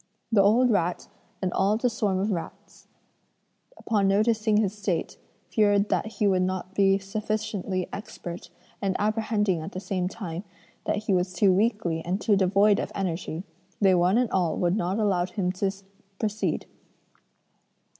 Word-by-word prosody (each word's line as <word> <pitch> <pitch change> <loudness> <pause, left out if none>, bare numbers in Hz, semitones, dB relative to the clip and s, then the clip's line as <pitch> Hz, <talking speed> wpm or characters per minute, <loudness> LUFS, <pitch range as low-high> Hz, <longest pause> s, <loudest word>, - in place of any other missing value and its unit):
The 210 -3 +5
old 235 +5 +4
rat 175 -4 0 0.4
and 185 - 0
all 200 +3 +2
the 250 - +1
swarm 210 -5 0
of 200 +3 0
rats, 170 -4 -7 0.9
upon 205 -3 +1
noticing 215 +1 +2
his 210 -2 +1
state, 195 -5 -2 0.4
feared 205 -2 +3
that 220 - -1
he 210 - 0
would 190 -2 +3
not 185 0 -2
be 195 0 +4
sufficiently 205 -2 -3
expert, 175 -4 -7 0.3
and 195 -2 0
apprehending 210 -4 0
at 155 - -7
the 185 - -4
same 185 -1 -2
time 180 -3 -6 0.4
that 210 - -1
he 205 - +1
was 180 0 0
too 190 +1 +4
weakly 200 -5 +1
and 180 +3 -1
too 210 -1 +3
devoid 200 +2 +4
of - - -3
energy, 175 -2 -3 0.4
they 195 -2 +5
one 180 +4 +3
and 245 -2 +1
all 180 -4 +1
would 175 +1 +1
not 185 -1 -1
allow 190 -5 +1
him 185 -1 -1
to 195 +1 -1 0.5
proceed. 215 0 -1
195 Hz, 155 wpm, -26 LUFS, 185-215 Hz, 0.9 s, The